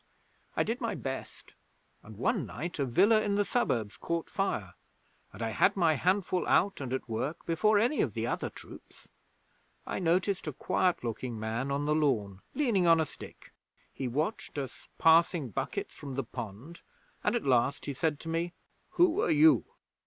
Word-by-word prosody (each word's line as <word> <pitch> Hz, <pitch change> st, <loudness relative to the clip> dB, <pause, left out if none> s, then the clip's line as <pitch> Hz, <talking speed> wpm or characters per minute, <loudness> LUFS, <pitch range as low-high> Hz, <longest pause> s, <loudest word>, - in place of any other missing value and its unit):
I -, -, +4 dB
did 235 Hz, +4 st, -3 dB
my 230 Hz, -, -1 dB
best, 135 Hz, -1 st, -6 dB, 0.5 s
and 110 Hz, -2 st, -13 dB
one 190 Hz, -, 0 dB
night 155 Hz, -, -5 dB
a 140 Hz, -, +2 dB
villa 200 Hz, -, +4 dB
in 205 Hz, -1 st, 0 dB
the 205 Hz, 0 st, +2 dB
suburbs 115 Hz, -, 0 dB
caught 170 Hz, -1 st, -3 dB
fire, 110 Hz, -, -2 dB, 0.6 s
and 105 Hz, +4 st, -7 dB
I 115 Hz, -, -1 dB
had 195 Hz, -, +3 dB
my 165 Hz, -4 st, +4 dB
handful 185 Hz, +3 st, +1 dB
out 195 Hz, -3 st, +2 dB
and 130 Hz, -2 st, -4 dB
at 130 Hz, 0 st, -3 dB
work 125 Hz, +7 st, -3 dB
before 205 Hz, +6 st, +3 dB
any 240 Hz, +8 st, +2 dB
of -, -, -1 dB
the -, -, -1 dB
other -, -, -2 dB
troops. -, -, -14 dB, 0.8 s
I -, -, -3 dB
noticed 180 Hz, +1 st, +1 dB
a 155 Hz, -, -2 dB
quiet 180 Hz, +5 st, 0 dB
looking 115 Hz, 0 st, -4 dB
man 115 Hz, +5 st, -2 dB
on 140 Hz, +1 st, -1 dB
the 150 Hz, -, +2 dB
lawn, 110 Hz, -11 st, 0 dB
leaning 225 Hz, -12 st, +2 dB
on 165 Hz, -1 st, +6 dB
a 160 Hz, -, +2 dB
stick. -, -, -12 dB, 0.4 s
He 130 Hz, -, -3 dB
watched 155 Hz, -, -2 dB
us 135 Hz, -2 st, -6 dB
passing 165 Hz, -3 st, +4 dB
buckets 100 Hz, -, -4 dB
from 140 Hz, -3 st, -8 dB
the 135 Hz, -, -1 dB
pond, 120 Hz, -, -8 dB, 0.4 s
and -, -, +2 dB
at 235 Hz, -, -1 dB
last 130 Hz, +1 st, +2 dB
he 140 Hz, -, -3 dB
said 150 Hz, +1 st, -1 dB
to -, -, -9 dB
me: 165 Hz, +2 st, -1 dB, 0.4 s
"Who 355 Hz, +3 st, +4 dB
are 445 Hz, -, +1 dB
you?" 315 Hz, 0 st, +5 dB
160 Hz, 180 wpm, -30 LUFS, 125-195 Hz, 0.8 s, on